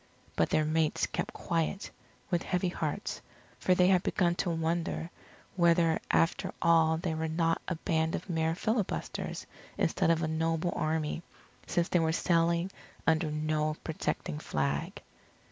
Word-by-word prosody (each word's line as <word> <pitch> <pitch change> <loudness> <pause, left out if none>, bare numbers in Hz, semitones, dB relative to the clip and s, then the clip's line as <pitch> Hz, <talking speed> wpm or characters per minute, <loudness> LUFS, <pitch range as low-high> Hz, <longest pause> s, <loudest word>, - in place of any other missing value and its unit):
But - - +2
their 155 - +2
mates 155 0 +1
kept - - -3
quiet, 170 +3 -2 0.4
with 175 -1 +2
heavy 180 0 0
hearts, - - -3 0.4
for 185 - +3
they 180 - +5
had 185 -2 +5
begun 175 -2 +1
to 180 - 0
wonder 165 0 -1 0.4
whether 170 -2 +4
after 165 - +2
all 165 -1 +4
they 165 0 -2
were 160 0 -2
not 165 +1 +1
a 180 - -1
band 160 0 0
of 180 - -6
mere 160 -2 0
filibusters 220 +1 -2 0.3
instead - - +1
of 165 0 +3
a - - +1
noble 165 +2 0
army, 155 0 -1 0.5
since 175 0 +1
they 175 - +2
were 160 -1 +2
sailing 170 +1 +2 0.3
under 160 0 +2
no 155 0 0
protecting 150 -1 -3
flag. 70 - -2
165 Hz, 145 wpm, -30 LUFS, 160-175 Hz, 0.5 s, they